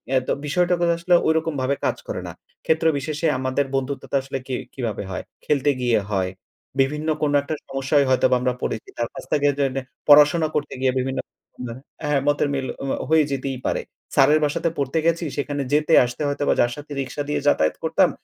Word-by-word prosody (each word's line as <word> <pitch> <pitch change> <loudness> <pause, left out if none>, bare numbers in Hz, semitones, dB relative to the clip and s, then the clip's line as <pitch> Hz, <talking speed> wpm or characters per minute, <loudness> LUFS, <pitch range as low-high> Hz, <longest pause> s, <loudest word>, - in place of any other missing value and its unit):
এ - - +6 0.3
বিষয়টা 175 +4 +2 0.2
আসলে 170 +1 +1
ওইরকম 160 0 +1
ভাবে 135 +2 +1
কাজ - - 0
করে - - -4
না। - - -7 0.3
ক্ষেত্রবিশেষে 160 -1 +1
আমাদের 130 +2 0
বন্ধুত্বটা 135 +1 -3
আসলে 135 0 -5
কি 130 - -2 0.2
কিভাবে 115 -6 -3
হয়? 95 - -4 0.2
খেলতে 145 -1 +2
গিয়ে 120 -3 +3
হয়, 95 -3 0 0.5
বিভিন্ন 150 +3 +1
কোনো 145 -1 +2
একটা 145 +3 -4
সমস্যায় 135 +1 +1
হয়তোবা 130 0 +4
আমরা 125 0 +1
পড়েছি 110 - -3
তার 120 - 0
কাছ - - -8
থেকে 145 -1 +3
যেনে 135 -1 0 0.3
পড়াশোনা 150 +3 +7
করতে 150 -1 -1
গিয়ে 130 -1 +3
বিভিন্ন 130 +1 -2 0.9
হ্যাঁ 150 -1 +2
মতের 145 0 +2
মিল 135 -2 -2 0.2
ওমা 135 - -1
হয়ে 160 -1 +5
যেতেই 135 -1 -2
পারে। - - 0 0.3
স্যারের 155 +1 +5
বাসাতে 150 +3 0
পড়তে 140 +3 0
গেছি 170 0 +1
সেখানে 145 0 -2
যেতে 150 +2 +3
আসতে 125 +4 -6
হয়তোবা 145 0 +1
যার 120 - +2
সাথে 145 0 -11
রিক্সা 135 +2 -4
দিয়ে 150 0 0
যাতায়াত 80 - +3
করতাম - - +3
145 Hz, 180 wpm, -23 LUFS, 130-150 Hz, 0.9 s, পড়াশোনা